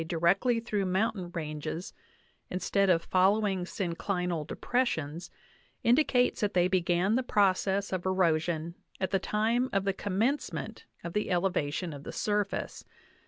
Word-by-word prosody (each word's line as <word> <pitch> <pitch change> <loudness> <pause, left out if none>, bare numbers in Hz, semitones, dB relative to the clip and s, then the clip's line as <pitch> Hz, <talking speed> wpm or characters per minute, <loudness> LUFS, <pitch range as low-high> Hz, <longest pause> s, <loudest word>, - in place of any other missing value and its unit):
directly 195 +9 +2
through 215 -3 -1
mountain 190 0 0
ranges, 155 +2 -4 0.6
instead 195 +2 +1
of 165 -2 +3
following 190 0 +2
syn 180 -4 -3
clinal 180 -3 -2
depressions, 170 - -1 0.5
indicates 250 0 +3
that 205 -2 0
they 180 0 +4
began 180 +1 +2
the 255 - +2
process 200 -3 +1
of 185 -1 -2
ero 185 -3 +3
\ - - -2
sion 165 0 -3 0.3
at 190 0 -1
the 195 - +2
time 225 +6 +1
of 195 -1 +1
the 195 - +1
commencement 215 +9 -2 0.2
of 170 - -5
the 210 - -1
elevation 175 -2 0
of 140 - -8
the - - -8
J - - -7
surface. 205 -2 -1
190 Hz, 150 wpm, -29 LUFS, 175-210 Hz, 0.6 s, they